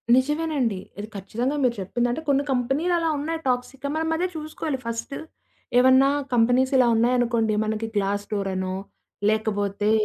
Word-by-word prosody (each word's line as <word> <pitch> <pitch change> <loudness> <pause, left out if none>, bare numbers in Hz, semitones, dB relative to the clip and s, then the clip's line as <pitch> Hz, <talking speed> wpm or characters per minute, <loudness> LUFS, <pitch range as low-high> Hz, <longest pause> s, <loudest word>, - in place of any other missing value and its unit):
నిజమేనండి. 280 - 0 0.2
ఇది 210 - -5
ఖచ్చితంగా 235 +8 -2
మీరు 245 -2 +2
చెప్పింది. 240 +6 -1
అంటే 255 - -3
కొన్ని 280 0 +3
కంపెనీలలా 315 +7 +1
ఉన్నాయి. 320 +3 -3
టాక్సిక్‌గా, 260 +2 -2
మనం 320 0 0
అదే 355 +3 0
జూసుకోవాలి 310 -2 -4
ఫస్ట్. 230 +4 -4 0.6
ఏవన్నా 260 +2 +6 0.2
కంపెనీసిలా 250 +2 +4
ఉన్నాయనుకోండి. 235 -1 +2
మనకి 220 +1 -2
గ్లాస్ 205 0 0
డోరనో, 190 -2 -2 0.6
లేకపోతే 205 -1 0
245 Hz, 125 wpm, -24 LUFS, 215-280 Hz, 0.6 s, ఏవన్నా